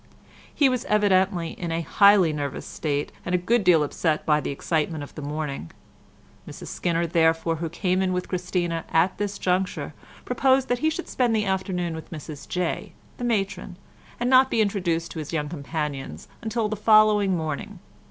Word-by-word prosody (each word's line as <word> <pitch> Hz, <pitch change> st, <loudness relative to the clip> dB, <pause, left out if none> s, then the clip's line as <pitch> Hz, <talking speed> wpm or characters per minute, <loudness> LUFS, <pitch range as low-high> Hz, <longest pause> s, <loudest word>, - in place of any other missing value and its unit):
He 285 Hz, -, +3 dB
was 255 Hz, -2 st, 0 dB
evidently 190 Hz, -4 st, +2 dB
in 170 Hz, -2 st, -5 dB
a 165 Hz, +1 st, -1 dB
highly 200 Hz, -1 st, +5 dB
nervous 145 Hz, -2 st, -4 dB
state, 145 Hz, -2 st, -3 dB
and 180 Hz, -, -1 dB
a -, -, +4 dB
good 215 Hz, +6 st, +1 dB
deal 175 Hz, -4 st, +5 dB
upset 155 Hz, +1 st, -1 dB
by 150 Hz, -1 st, +3 dB
the -, -, -4 dB
excitement 155 Hz, +1 st, -1 dB
of 145 Hz, -, -11 dB
the 155 Hz, -, -8 dB
morning, 145 Hz, -, -4 dB, 0.8 s
Mrs -, -, -9 dB
Skinner 170 Hz, -1 st, -1 dB
therefore, 165 Hz, 0 st, +2 dB
who 165 Hz, +1 st, -3 dB
came 185 Hz, +2 st, 0 dB
in 190 Hz, -1 st, +1 dB
with 180 Hz, 0 st, -2 dB
Christina 175 Hz, -2 st, -2 dB
at 175 Hz, +4 st, +2 dB
this 205 Hz, -1 st, -2 dB
juncture, 185 Hz, +1 st, -1 dB, 0.3 s
proposed 265 Hz, 0 st, +2 dB
that 245 Hz, 0 st, +1 dB
he 315 Hz, -, +2 dB
should 340 Hz, +3 st, -4 dB
spend 245 Hz, -3 st, +1 dB
the 215 Hz, -1 st, +1 dB
afternoon 185 Hz, -3 st, -1 dB
with 160 Hz, 0 st, -8 dB
Mrs 155 Hz, -2 st, -9 dB
Jay, 180 Hz, -2 st, -2 dB, 0.2 s
the -, -, -6 dB
matron, 200 Hz, -5 st, -2 dB, 0.4 s
and 240 Hz, -, 0 dB
not 260 Hz, +1 st, +6 dB
be 230 Hz, -, 0 dB
introduced 180 Hz, -6 st, 0 dB
to 160 Hz, -, -6 dB
his 155 Hz, +1 st, -6 dB
young 150 Hz, -2 st, -1 dB
companions 140 Hz, -, -5 dB
until 225 Hz, -1 st, -1 dB
the 215 Hz, -, -3 dB
following 210 Hz, -3 st, +4 dB
morning. 160 Hz, +6 st, -4 dB
180 Hz, 180 wpm, -25 LUFS, 160-205 Hz, 0.8 s, not